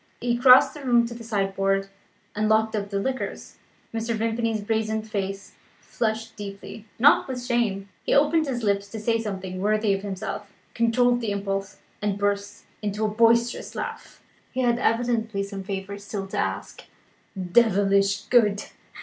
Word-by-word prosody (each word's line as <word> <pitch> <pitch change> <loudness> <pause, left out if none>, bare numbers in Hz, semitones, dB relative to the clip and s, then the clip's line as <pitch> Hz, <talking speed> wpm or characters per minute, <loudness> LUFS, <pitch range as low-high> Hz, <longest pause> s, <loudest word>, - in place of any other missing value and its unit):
He 240 0 0
crossed 250 +1 +7
the 295 - -9
room 240 -2 +4
to 235 - -6
the 235 0 -9
sideboard, 195 -2 0 0.5
and 215 +1 +1
locked 220 0 +3
up 205 -1 -3
the 200 -1 -1
liqueurs. 260 +5 -4 0.4
Mr. 230 0 -1
Vimpany's 225 0 -1
brazen 220 0 -1
face 195 -2 -4 0.3
flushed 225 -1 -3
deeply 205 +1 -8
(not 285 +6 +5
with 250 -2 -5
shame); 225 -6 0 0.2
he - - -2
opened 300 +2 +3
his 245 -3 -3
lips 200 -1 +1
to 220 +2 -7
say 230 +2 +1
something 190 -3 -5
worthy 210 0 +2
of 195 - -2
himself, 200 +1 -5 0.2
controlled 245 +1 +2
the 225 - -2
impulse, 195 -1 -3 0.2
and 205 -1 -1
burst 205 0 -2 0.2
into 210 +1 -1
a - - +1
boisterous 230 +2 +2
laugh. - - -7 0.3
He 260 - -2
had 240 -1 +2
evidently 230 -4 0
some 195 0 -6
favour 195 +1 -5
still 200 -1 -5
to - - -4
ask. - - -3 0.6
"Devilish 200 0 +3
good!" 210 -4 +3
215 Hz, 160 wpm, -25 LUFS, 200-235 Hz, 0.6 s, crossed